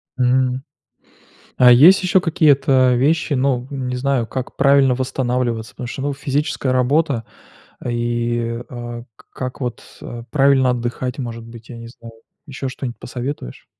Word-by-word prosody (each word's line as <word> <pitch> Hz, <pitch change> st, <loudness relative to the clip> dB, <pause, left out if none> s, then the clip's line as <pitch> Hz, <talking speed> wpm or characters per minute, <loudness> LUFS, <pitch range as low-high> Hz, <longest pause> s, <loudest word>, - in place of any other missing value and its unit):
Мгм. 130 Hz, 0 st, +1 dB, 0.9 s
А 125 Hz, -1 st, +7 dB
есть 160 Hz, +11 st, +7 dB
ещё 185 Hz, +1 st, +3 dB
какие-то 140 Hz, -6 st, +3 dB
вещи, 150 Hz, +5 st, +1 dB
ну, 130 Hz, -2 st, 0 dB
не 130 Hz, -3 st, -4 dB
знаю, 130 Hz, -1 st, 0 dB
как 130 Hz, +1 st, -5 dB
правильно 140 Hz, -2 st, +4 dB
восстанавливаться? 125 Hz, -3 st, -2 dB
Потому 125 Hz, -, -7 dB
что, 130 Hz, -, -6 dB
ну, 145 Hz, 0 st, -1 dB
физическая 140 Hz, -1 st, -2 dB
работа, 130 Hz, -1 st, +1 dB, 0.6 s
и 120 Hz, 0 st, -2 dB
а 120 Hz, -1 st, -7 dB
к -, -, -21 dB
как 130 Hz, -1 st, -6 dB
вот, 125 Hz, -2 st, -4 dB, 0.2 s
э, 120 Hz, -1 st, -8 dB
правильно 135 Hz, -2 st, +4 dB
отдыхать, 125 Hz, +1 st, -3 dB
может 115 Hz, -3 st, -5 dB
быть, 115 Hz, 0 st, -13 dB
я 120 Hz, -, -8 dB
не 115 Hz, 0 st, -9 dB
знаю. 115 Hz, -1 st, -13 dB, 0.3 s
Ещё 135 Hz, -2 st, -5 dB
что-нибудь 130 Hz, -2 st, -6 dB
посоветуешь? 125 Hz, -, -6 dB
125 Hz, 145 wpm, -19 LUFS, 120-140 Hz, 0.9 s, А